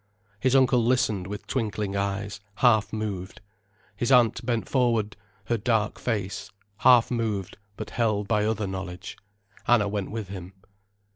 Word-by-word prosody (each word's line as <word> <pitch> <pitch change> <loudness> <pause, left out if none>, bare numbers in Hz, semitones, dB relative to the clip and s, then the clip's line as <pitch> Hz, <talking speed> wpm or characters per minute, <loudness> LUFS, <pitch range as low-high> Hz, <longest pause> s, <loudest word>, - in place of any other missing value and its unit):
His 130 +3 +2
uncle 130 -2 +4
listened 115 -6 +1
with 105 +1 -6
twinkling 105 -5 -2
eyes, 100 0 -2 0.2
half 110 -4 +3
moved. 100 -4 -4 0.6
His 120 +6 -1
aunt 125 -2 +4
bent 120 -2 -1
forward 115 -5 +1 0.3
her 120 - 0
dark 110 -1 0
face, 100 -3 -3 0.3
half 125 -1 +5
moved, 110 -6 -2 0.2
but - - -6
held 105 -4 0
by 105 -1 +2
other 110 -1 0
knowledge. 95 -1 -6 0.5
Anna 115 -4 +4
went 100 -1 -3
with 110 -3 -5
him. 95 -1 -8
110 Hz, 140 wpm, -26 LUFS, 100-120 Hz, 0.6 s, half